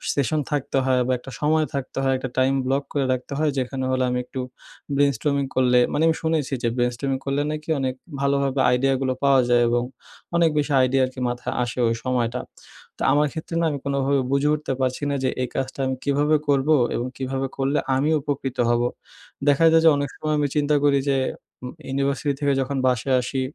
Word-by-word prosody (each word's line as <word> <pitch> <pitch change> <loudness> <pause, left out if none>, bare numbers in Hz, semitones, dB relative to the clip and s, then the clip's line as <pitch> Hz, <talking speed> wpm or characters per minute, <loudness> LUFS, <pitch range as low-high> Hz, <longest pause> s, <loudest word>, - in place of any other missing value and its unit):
session 150 +2 +1
থাকতে 140 -2 -1
হয় 130 -1 +2
বা, - - +1
একটা 135 +2 -11
সময় 155 +1 +2
থাকতে 135 -2 -5
হয়। 135 0 +2
একটা 130 0 -5
time 135 +1 +3
block 135 +2 0
করে 140 -2 +1
রাখতে 130 +2 -5
হয়। 155 -1 +2
যেখানে 130 +1 -3
হলো 130 0 +1
আমি 125 - 0
একটু 130 - -7 0.6
brainstorming 140 0 +1
করলে 125 -1 +4
মানে 155 - +1
আমি 160 - +3
শুনেছি 155 -3 0
যে - - +2
brainstorming 125 +2 -1
করলে 140 +1 0
নাকি 155 +1 -6
অনেক 130 -1 -1 0.3
ভালোভাবে 140 -1 +1 0.2
idea 135 +2 +2
গুলো 130 -1 0
পাওয়া 135 -1 +5
যায় 120 0 +4
এবং 120 0 +1 0.5
অনেক 170 -1 +4
বেশি 145 0 0
idea 130 +1 +1
আরকি 130 +1 -9
মাথায় 120 0 -4
আসে 120 - -5
ওই 115 - +1
সময়টা। 125 -1 -1 0.6
তো - - -12
আমার 150 +1 +3
ক্ষেত্রে 160 +1 -6
না 165 - +2
আমি 140 - -4
কোনোভাবে 140 0 +1
বুঝে 140 +2 +2
উঠতে 150 -3 -3
পারছি 130 +2 -1
না 140 - 0
যে 130 - +2
এই - - -2
কাজটা 135 +1 -3
আমি 130 0 -1
কীভাবে 145 +2 +2
করবো 145 +2 +3 0.2
এবং 120 - -2
কীভাবে 135 0 -2
করলে 135 +2 0 0.2
আমি 145 +4 +1
উপকৃত 135 -2 -3
হব? 120 0 +2 0.7
দেখা 145 +3 +4
যায় 160 0 +5
যে - - +9
অনেক 145 -1 -2
সময় 155 0 -1
আমি 145 - +1
চিন্তা 150 0 +2
করি 140 -1 +4
যে 135 - +2 0.5
উম 125 - -6 0.2
ইউনিভার্সিটি 140 +2 0
থেকে 140 -1 +2
যখন 135 +1 -2
বাসায় 130 +1 +1
আসি, 130 +2 -3
135 Hz, 200 wpm, -23 LUFS, 130-145 Hz, 0.7 s, যে